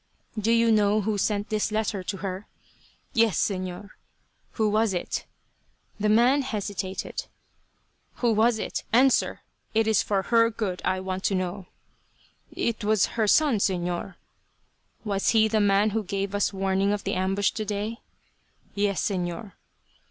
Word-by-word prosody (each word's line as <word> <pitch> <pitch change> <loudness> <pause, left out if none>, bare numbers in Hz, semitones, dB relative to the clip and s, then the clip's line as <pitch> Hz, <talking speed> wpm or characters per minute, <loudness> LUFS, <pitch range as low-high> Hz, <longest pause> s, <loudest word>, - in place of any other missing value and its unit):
"Do 220 +1 0
you 230 0 +4
know 210 0 +3
who 210 0 -1
sent 205 +1 0
this 215 0 0
letter 215 -2 -1
to 195 +2 -4
her?" 190 +2 -5 0.7
"Yes, 230 -4 +3
Señor." 185 +1 -3 0.6
"Who 220 -2 +1
was 215 -1 +1
it?" 175 - -3 0.7
The 210 +1 +1
man 245 +6 +4
hesitated. 205 - -4 0.9
"Who 240 -2 +1
was 220 +2 +3
it? - - -4
Answer. 255 +3 +3 0.3
It 225 0 +3
is 220 -3 +3
for 195 -2 0
her 230 +1 +4
good 210 -5 -3
I 185 0 0
want 190 0 -4
to 195 - +2
know." 185 0 -3 0.8
"It 230 -1 -2
was 210 -1 +3
her 220 -2 +1
son, 290 +1 +4
Señor." 180 -1 -1 0.9
"Was 200 -2 0
he 220 0 +5
the 215 0 +1
man 205 +1 +3
who 220 +2 0
gave 195 +1 -3
us 205 -1 +1
warning 195 +1 +1
of 205 - -3
the - - -2
ambush 190 +2 +1
today?" 215 +1 -3 0.7
"Yes, 200 -2 0
Señor." 190 +1 -3
205 Hz, 145 wpm, -26 LUFS, 195-220 Hz, 0.9 s, he